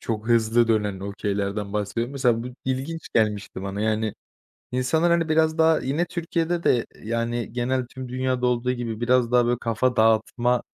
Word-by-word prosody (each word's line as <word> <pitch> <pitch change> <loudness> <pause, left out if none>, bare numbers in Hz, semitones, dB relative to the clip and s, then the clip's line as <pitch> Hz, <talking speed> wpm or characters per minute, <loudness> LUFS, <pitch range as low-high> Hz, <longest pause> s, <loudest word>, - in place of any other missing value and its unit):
çok 110 0 -4
hızlı 115 0 +3
dönen 105 -4 0
okeylerden 100 0 -3
bahsediyorum. 105 +5 -2
Mesela 120 -4 +1
bu 125 - -6 0.2
ilginç 135 +6 -3
gelmişti 105 -3 0
bana, 100 +1 -4
yani, 110 0 0 0.6
insanlar, 145 +7 +2
hani, 170 -1 +2
biraz 160 0 +2
daha 160 0 +5
yine 145 +7 0
Türkiye'de 170 0 -2
de, 120 -2 +2 0.2
yani, 115 +1 -2
genel 125 +1 -1
tüm 130 0 -8
dünyada 130 0 -1
olduğu 125 +1 +1
gibi 115 -3 -4
biraz 125 0 +2
daha, 120 -1 +4
böyle, 120 0 +1
kafa 125 +2 0
dağıtma, 115 +2 +2
120 Hz, 160 wpm, -24 LUFS, 110-130 Hz, 0.6 s, daha